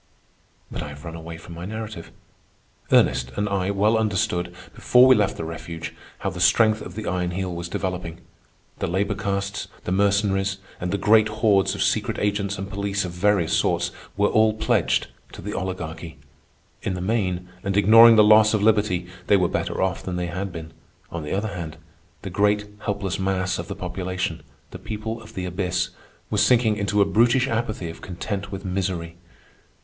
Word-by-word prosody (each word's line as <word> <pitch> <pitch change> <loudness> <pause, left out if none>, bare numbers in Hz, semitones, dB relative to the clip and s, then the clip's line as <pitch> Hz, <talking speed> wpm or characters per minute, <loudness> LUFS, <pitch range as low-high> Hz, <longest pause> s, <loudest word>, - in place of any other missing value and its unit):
But - - -4
I 75 - -5
have 75 +2 -11
run 80 - -6
away 85 0 -8
from 85 +1 -11
my 85 +1 -8
narrative. 110 -3 -6 0.8
Ernest 65 0 +3
and 105 0 0
I 100 -2 -1
well 105 +3 +2
understood, 95 -5 0 0.2
before 125 +1 +5
we 130 - +8
left 105 -4 +1
the - - -4
refuge, 80 0 -6 0.2
how - - -3
the - - -7
strength 110 -1 +4
of 90 - -8
the 110 0 -5
Iron 90 0 -1
Heel 90 0 -3
was 85 0 -5
developing. 90 -2 -4 0.6
The - - -1
labor 100 +4 0
castes, 100 0 -3 0.2
the - - -3
Mercenaries, 100 0 +2 0.2
and 90 - -3
the 100 - 0
great 110 +2 +5
hordes 105 -2 +2
of - - 0
secret - - 0
agents 100 -1 -1
and 95 +1 -5
police 100 0 -2
of 90 - -5
various 90 -1 +1
sorts - - +1 0.3
were 105 0 +3
all 110 -1 +4
pledged 110 - +1 0.3
to - - -9
the 105 +2 -4
Oligarchy. 85 -3 -5 0.6
In 95 - -2
the - - -5
main, 90 -3 -1
and 100 0 -1
ignoring 115 +3 +8
the 105 - +7
loss 110 +1 +6
of 105 - 0
liberty, 105 -5 +2 0.2
they 100 - +5
were 90 -2 +2
better - - -1
off 95 -2 -1
than 90 - -4
they 90 0 -1
had 90 +3 -4
been. 80 -1 -8 0.4
On 85 - -4
the 75 - -4
other 105 +3 -1
hand, 85 -5 -6 0.5
the - - -5
great 105 0 +2
helpless 100 -3 -3
mass 95 -1 0
of 85 - -5
the - - -5
population, 90 -2 -3 0.3
the - - -8
people 110 +1 -5
of 110 - -14
the 95 - -3
abyss, 90 0 -1 0.4
was 105 -1 +3
sinking 115 -1 +4
into 100 0 +2
a - - 0
brutish 120 +5 +3
apathy 110 -6 -2
of 80 - -13
content 100 +2 -5
with 100 0 -6
misery. 90 -3 -2
95 Hz, 185 wpm, -23 LUFS, 90-105 Hz, 0.8 s, we